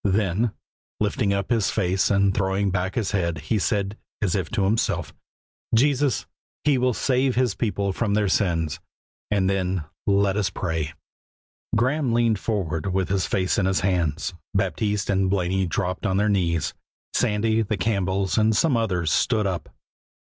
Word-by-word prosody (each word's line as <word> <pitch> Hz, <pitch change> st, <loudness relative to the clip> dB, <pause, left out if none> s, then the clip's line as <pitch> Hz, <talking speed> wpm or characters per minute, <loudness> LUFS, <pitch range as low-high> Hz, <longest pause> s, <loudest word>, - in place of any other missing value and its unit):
Then, 100 Hz, +2 st, +1 dB, 0.5 s
lifting 105 Hz, 0 st, +1 dB
up 100 Hz, +1 st, -1 dB
his 115 Hz, -4 st, +2 dB
face 95 Hz, -2 st, +1 dB
and 100 Hz, -1 st, +3 dB
throwing 95 Hz, 0 st, 0 dB
back 95 Hz, +1 st, -1 dB
his 110 Hz, -5 st, -1 dB
head, 85 Hz, -5 st, 0 dB
he 80 Hz, +9 st, -1 dB
said, 100 Hz, +1 st, -1 dB, 0.2 s
as 100 Hz, -5 st, 0 dB
if 95 Hz, -6 st, -1 dB
to 100 Hz, -, 0 dB
himself, 105 Hz, +4 st, 0 dB, 0.6 s
"Jesus! 140 Hz, 0 st, +2 dB, 0.4 s
He 150 Hz, -, +4 dB
shall 125 Hz, -1 st, +1 dB
save 130 Hz, +4 st, +1 dB
His 125 Hz, -4 st, +2 dB
people 100 Hz, -4 st, -1 dB
from 105 Hz, 0 st, 0 dB
their 105 Hz, -1 st, +2 dB
sins," 85 Hz, -6 st, 0 dB, 0.5 s
and 100 Hz, -2 st, +2 dB
then, 95 Hz, -3 st, 0 dB, 0.2 s
"Let 100 Hz, 0 st, +3 dB
us 105 Hz, -1 st, +1 dB
pray." 80 Hz, -4 st, -3 dB, 0.8 s
Graeme 130 Hz, +2 st, +1 dB
leaned 115 Hz, -3 st, +2 dB
forward 95 Hz, -5 st, -2 dB
with 95 Hz, 0 st, 0 dB
his 95 Hz, -1 st, 0 dB
face 95 Hz, +1 st, +1 dB
in 95 Hz, -, +2 dB
his 95 Hz, 0 st, +1 dB
hands; 90 Hz, -2 st, 0 dB, 0.2 s
Baptiste 100 Hz, +2 st, 0 dB
and 95 Hz, -1 st, +2 dB
Blaney 95 Hz, 0 st, +1 dB
dropped 90 Hz, +3 st, -2 dB
on 95 Hz, 0 st, +1 dB
their 105 Hz, +1 st, +2 dB
knees; 85 Hz, -5 st, +1 dB, 0.4 s
Sandy, 110 Hz, +2 st, +2 dB
the 110 Hz, -1 st, -1 dB
Campbells, 95 Hz, 0 st, 0 dB
and 110 Hz, 0 st, +3 dB
some 160 Hz, -6 st, +3 dB
others 90 Hz, -9 st, 0 dB
stood 110 Hz, -4 st, +2 dB
up. 95 Hz, -3 st, -3 dB
100 Hz, 160 wpm, -24 LUFS, 95-110 Hz, 0.8 s, He